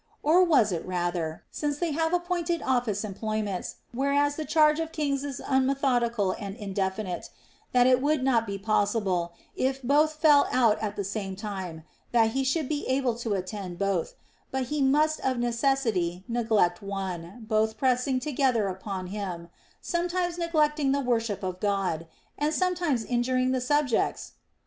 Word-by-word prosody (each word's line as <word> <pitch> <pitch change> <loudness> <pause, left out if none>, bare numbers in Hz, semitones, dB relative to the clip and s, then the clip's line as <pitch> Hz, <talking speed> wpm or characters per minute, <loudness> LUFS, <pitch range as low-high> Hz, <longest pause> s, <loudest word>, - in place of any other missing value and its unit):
Or 340 +5 +5
was 275 - +4
it 170 - -2
rather, 175 -3 -2
— - - -46
since 290 -1 -2
they 340 0 -1
have 320 +2 0
appointed 350 -1 -1
office 240 -5 0
em 205 - -5
ployments, 215 -2 -3 0.2
whereas 285 +3 +1
the 310 - -4
charge 305 0 +4
of 325 0 -3
kings 285 -3 -1
is 280 -3 -5
unmethodical 255 -6 +1
and 200 -2 -5
indefinite, 195 -3 -3 0.2
— - - -34
that 245 -1 +5
it 255 0 +4
would 290 -1 +1
not 235 -4 +2
be 200 0 -3
possible, 195 -4 0 0.2
if 265 +1 0
both 295 +4 +3
fell 305 -2 +5
out 230 -4 +3
at 210 -2 -2
the 200 - -2
same 195 -1 -4
time, 190 -6 -6 0.3
that 225 -2 +4
he 270 +3 0
should 265 +3 0
be 295 0 -2
able 260 -2 +1
to 230 -3 -1
attend 185 -1 -5
both, 195 -3 -1 0.3
but 265 0 -1
he 300 - 0
must 300 +3 +3
of 260 -1 0
necessity 235 -7 0
neglect 220 -7 +1
one 195 +1 -5
(both 220 0 +1
pressing 255 +1 +1
to 300 - -3
gether 250 -7 +2
upon 190 0 -5
him), 180 -3 -5 0.3
sometimes 350 0 -1
neglecting 305 -5 +1
the 280 - +1
worship 230 -6 -1
of 185 -1 -3
God, 190 -5 -1 0.3
and 300 +1 +1
sometimes 345 -10 0
injuring 255 +1 +1
the 260 -1 0
subjects 270 -2 0
240 Hz, 165 wpm, -27 LUFS, 200-285 Hz, 0.3 s, Or